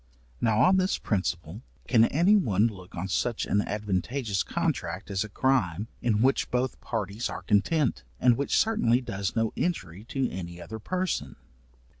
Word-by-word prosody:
Now 110 -2 +3
on 190 +1 +5
this 185 0 +1
principle, 90 -1 -2 0.3
can 115 -3 +5
any 175 - +4
one 110 - +3
look 95 -5 -5
on 90 +2 -3
such 110 +6 -1
an 100 - +2
advantageous 105 +2 -1
contract 90 +5 -2
as 100 +1 0
a 110 - -8
crime, 105 -4 +1
in 110 -2 +2
which 135 +1 +2
both 125 0 -1
parties 105 0 -3
are - - -6
content, 115 - +1 0.2
and 125 -2 +5
which 140 +3 0
certainly 130 - +3
does 100 -5 -3
no 115 -1 +1
injury 100 - -2
to 130 +2 -1
any 85 -1 -6
other 90 +6 -7
person? 185 - -2
110 Hz, 160 wpm, -27 LUFS, 95-130 Hz, 0.3 s, on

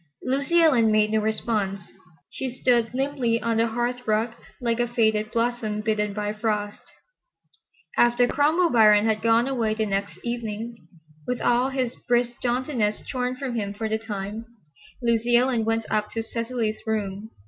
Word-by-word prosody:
Lucy 280 +6 +1
Ellen 240 -9 +4
made 215 0 +3
no 220 - +2
response. 210 -3 -2 0.4
She 265 - -4
stood 240 -2 +1
limply 255 -3 0
on 230 -1 -1
the 230 +1 +3
hearth 240 +2 -2
rug 220 +2 +1 0.3
like 235 -1 -1
a 240 - +2
faded 220 -2 +1
blossom 230 -2 -1
bitten 210 -1 0
by 210 0 -3
frost. 210 -1 -2 1.1
After 240 +1 +4
Cromwell 315 +7 +2
Biron 215 -2 +6
had 220 -1 +1
gone 230 +2 +3
away 230 -5 0
the 220 0 0
next 200 0 -2
evening, 230 -3 -5 0.4
with 250 - -1
all 245 +2 +2
his 260 -3 -2
brisk 240 0 +1
jauntiness 245 -3 -1
shorn 250 -1 -2
from 255 -1 -4
him 205 -3 -3
for 220 +1 -3
the 220 0 -1
time, 210 0 -5 0.6
Lucy 235 0 +2
Ellen 245 -2 +1
went 225 0 0
up 210 -1 0
to 225 - -2
Cecily's 230 -1 -3
room. 210 -1 -2
230 Hz, 160 wpm, -25 LUFS, 215-245 Hz, 1.1 s, Biron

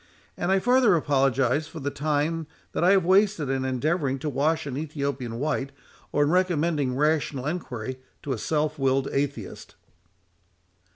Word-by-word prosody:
And 175 +2 -1
I 195 - +4
farther 245 -1 +4
apologise 135 -1 +2
for 160 - -9
the 145 0 -3
time 150 +2 -1 0.2
that - - -1
I 180 - +5
have 190 -3 +3
wasted 190 -5 +3
in 135 -1 -1
endeavouring 135 +2 0
to 150 +3 -3
wash 155 +4 +1
an 140 -3 -4
Ethiopian 140 -5 -3
white, 140 0 -1 0.4
or 145 - +3
in 145 - +1
recommending 165 -7 +1
rational 150 -2 0
enquiry 130 -6 -4 0.2
to 140 - -2
a 115 - -4
self 155 +2 -1
willed 135 0 +2
atheist." 140 -7 -3
145 Hz, 155 wpm, -26 LUFS, 135-165 Hz, 0.4 s, I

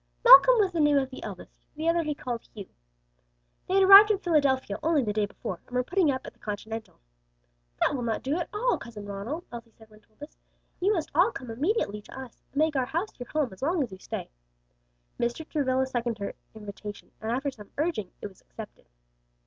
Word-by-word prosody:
Malcom - - +9
was 395 -3 +2
the 340 - -3
name 295 -1 +4
of 265 -1 0
the 260 - -9
eldest, - - -9 0.2
the 315 +2 -3
other 335 0 +3
he 300 -2 -3
called 240 -4 -5
Hugh. 200 -3 -8 1.0
They 375 - 0
had 390 - +5
arrived 395 +2 +10
in 425 - +3
Philadelphia 280 - +1
only 315 -4 +2
the 210 -2 -2
day 210 -1 0
before, 185 -3 -7
and 250 - -9
were 250 - +2
putting 360 +3 +1
up 260 -1 -2
at - - -9
the - - -33
Continental. 220 +1 -6 0.8
"That - - +2
will 265 - -2
not 230 -2 -2
do 275 +3 -1
at 345 - -4
all, 485 +4 0
Cousin 215 -3 -9
Ronald," 205 - -5
Elsie 235 -1 -9
said 220 -1 -18
when 215 - -17
told 215 0 -34
this. 295 +1 -11 0.4
"You 385 +4 +2
must 335 -7 -2
all 355 +9 +4
come 250 - -8
immediately 255 - -1
to 265 - -11
us, 260 -3 -11
and - - -11
make 310 0 +2
our 260 -2 0
house 340 +2 -4
your 245 - -8
home 295 -8 -1
as 190 - -16
long 320 +2 +1
as 240 - -7
you 190 - -10
stay." - - -6 0.9
Mr. 240 +7 -2
Travilla 265 -3 0
seconded 240 -3 -2
her 200 -1 -5 0.2
invitation, 205 -1 -9
and 220 +1 -3
after 270 +3 -1
some 210 -5 -14
urging, 290 - -1
it - - -4
was 190 - -18
accepted. 220 - -12
260 Hz, 220 wpm, -27 LUFS, 220-320 Hz, 1.0 s, arrived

